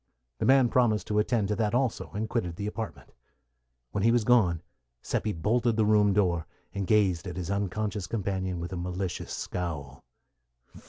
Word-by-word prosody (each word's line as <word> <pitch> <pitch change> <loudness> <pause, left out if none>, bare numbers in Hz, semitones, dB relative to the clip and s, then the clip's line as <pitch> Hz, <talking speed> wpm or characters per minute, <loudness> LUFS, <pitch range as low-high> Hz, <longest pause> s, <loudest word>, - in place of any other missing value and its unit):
The - - +1
man 130 -1 +6
promised 115 -3 +2
to 105 0 +2
attend 105 -1 +1
to 105 - +1
that 110 0 +1
also, 125 -2 0
and 110 +2 -1
quitted 105 -7 -2
the 100 - -4
apartment. 105 - -6 0.8
When 100 - -1
he 115 - +5
was 120 -1 +3
gone, 95 -8 +3 0.4
Seppi 110 - -1
bolted 115 +7 +1
the 110 -1 +3
room 105 -1 +4
door, 90 -5 +1 0.3
and 100 -2 -3
gazed 95 -6 +2
at 90 0 -6
his 90 +1 -3
unconscious 100 0 -2
companion 95 -4 -2
with 85 +2 -5
a - - -3
malicious 90 +1 -4
scowl. 75 -7 -4
100 Hz, 170 wpm, -28 LUFS, 90-110 Hz, 0.8 s, man